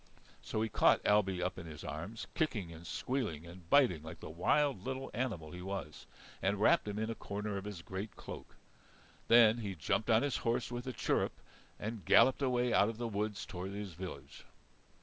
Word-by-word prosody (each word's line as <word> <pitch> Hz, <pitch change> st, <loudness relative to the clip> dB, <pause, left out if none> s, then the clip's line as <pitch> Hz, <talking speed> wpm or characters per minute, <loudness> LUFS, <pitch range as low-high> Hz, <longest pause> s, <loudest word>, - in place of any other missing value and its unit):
So 110 Hz, -, -2 dB
he -, -, 0 dB
caught -, -, +4 dB
Ailbe 95 Hz, -3 st, +3 dB
up 90 Hz, +1 st, -2 dB
in 85 Hz, -, -8 dB
his 75 Hz, -2 st, -9 dB
arms, 95 Hz, +9 st, -5 dB
kicking 105 Hz, -, -1 dB
and 85 Hz, +1 st, -10 dB
squealing 110 Hz, -, -2 dB
and 85 Hz, 0 st, -12 dB
biting 125 Hz, -, +5 dB
like 80 Hz, +1 st, -9 dB
the -, -, -8 dB
wild 130 Hz, -, +2 dB
little 130 Hz, +2 st, -4 dB
animal 100 Hz, -12 st, -3 dB
he 90 Hz, -, -7 dB
was, 90 Hz, -6 st, -6 dB, 0.3 s
and 100 Hz, +1 st, +1 dB
wrapped 105 Hz, -, +4 dB
him 105 Hz, 0 st, -3 dB
in 110 Hz, +1 st, -1 dB
a -, -, -1 dB
corner 105 Hz, -1 st, -4 dB
of 100 Hz, 0 st, -4 dB
his 100 Hz, -5 st, -6 dB
great 95 Hz, +3 st, -5 dB
cloak. -, -, -9 dB, 0.7 s
Then 115 Hz, -1 st, +7 dB
he 100 Hz, -4 st, -4 dB
jumped 85 Hz, +9 st, 0 dB
on 115 Hz, +2 st, +5 dB
his 145 Hz, -2 st, 0 dB
horse 115 Hz, +1 st, -1 dB
with 120 Hz, +1 st, -5 dB
a -, -, -1 dB
chirrup -, -, 0 dB, 0.5 s
and 110 Hz, -1 st, -4 dB
galloped 130 Hz, -, +5 dB
away 125 Hz, -2 st, +2 dB
out 100 Hz, -, +5 dB
of 115 Hz, -, -5 dB
the 120 Hz, 0 st, -2 dB
woods 105 Hz, -1 st, -2 dB
toward 95 Hz, +2 st, -6 dB
his 100 Hz, -3 st, -5 dB
village. 85 Hz, -5 st, -8 dB
105 Hz, 195 wpm, -34 LUFS, 90-115 Hz, 0.7 s, Then